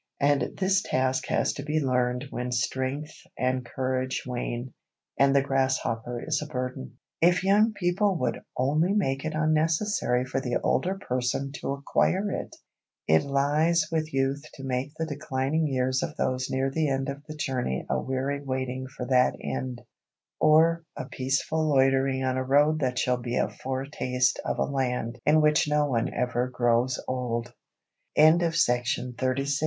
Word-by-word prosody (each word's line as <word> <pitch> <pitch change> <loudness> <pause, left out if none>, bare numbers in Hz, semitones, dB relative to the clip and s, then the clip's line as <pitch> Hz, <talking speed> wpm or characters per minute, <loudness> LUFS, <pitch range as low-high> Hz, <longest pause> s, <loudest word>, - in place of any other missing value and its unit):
And 140 0 +1
this 190 0 +3
task 130 0 0
has - - +1
to 140 - -6
be 155 +2 0
learned 125 -1 0
when 125 0 -3
strength 130 +5 -2 0.2
and 130 0 0
courage 130 +1 -2
wane, 125 0 -4 0.5
and 140 0 +4
the 140 - +4
grasshopper 130 -3 -1
is 155 -2 0
a 150 - -5
burden. 125 - -5 0.2
If 175 +2 +4
young 210 +3 +4
people 190 0 +1
would 125 - -1 0.2
only 150 +8 +2
make 135 -10 0
it 155 0 -2
unnecessary 155 -3 +1
for 135 +1 -2
the 125 -2 0
older 185 +2 +1
person 130 -3 -2
to - - -2
acquire 185 +8 0
it! - - -5 0.5
It 80 +1 +5
lies 150 +4 +2
with 160 -1 -1
youth 135 0 0
to 135 - -10
make 130 +1 -2
the 160 - -1
declining 145 +1 -1
years 130 -1 0
of - - -4
those 130 0 -1
near 135 +1 0
the 155 +1 0
end 135 0 -1
of 140 +1 -5
the 155 - -7
journey 125 - -2
a - - 0
weary 135 +2 -2
waiting 130 -1 -3
for 130 -1 -7
that 125 0 +3
end, 125 -2 -4 0.6
or 165 +2 +4
a - - -4
peaceful 135 +4 0
loitering 135 -1 +3
on 130 0 0
a 130 - 0
road 145 +4 +3
that 125 -3 -1
shall 125 -1 +1
be 120 0 -3
a - - +1
foretaste 130 -1 -1
of - - -2
a - - +2
Land 125 -4 -2
in 155 +1 +5
which 150 0 +3
no 150 -3 +1
135 Hz, 150 wpm, -27 LUFS, 130-155 Hz, 0.6 s, It